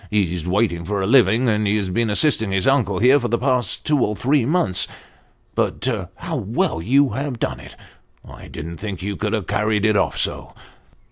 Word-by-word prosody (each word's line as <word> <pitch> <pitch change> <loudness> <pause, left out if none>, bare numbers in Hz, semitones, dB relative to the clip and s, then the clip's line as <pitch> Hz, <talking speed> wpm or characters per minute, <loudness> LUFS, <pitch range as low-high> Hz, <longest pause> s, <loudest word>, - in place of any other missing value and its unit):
He's 90 -5 -1
wait 100 +2 +1
ing 85 0 -6
for 100 +2 -2
a - - 0
living, 120 +1 +4
and 105 -2 +1
has 100 -2 0
been 115 +4 0
assisting 110 -1 +2
his 95 -1 0
uncle 120 -9 +2
here 130 +7 +5
for 120 - -2
the 120 +1 0
last 125 -1 0
two 150 -2 +2
or 105 - -1
three 135 +2 +1
months. 135 - +2 0.7
But - - -1 0.3
how - - -5
well 80 - -1
you 135 +9 +3
have 135 +2 -4
done - - -3
it - - -13 0.5
I - - -12
didn't 85 +2 -8
think 100 -2 -6
you 100 0 -3
could 105 +2 -3
have 105 -5 -1
carried 105 0 0
it 110 -1 +3
off - - 0
so - - -3
105 Hz, 200 wpm, -21 LUFS, 95-125 Hz, 0.7 s, here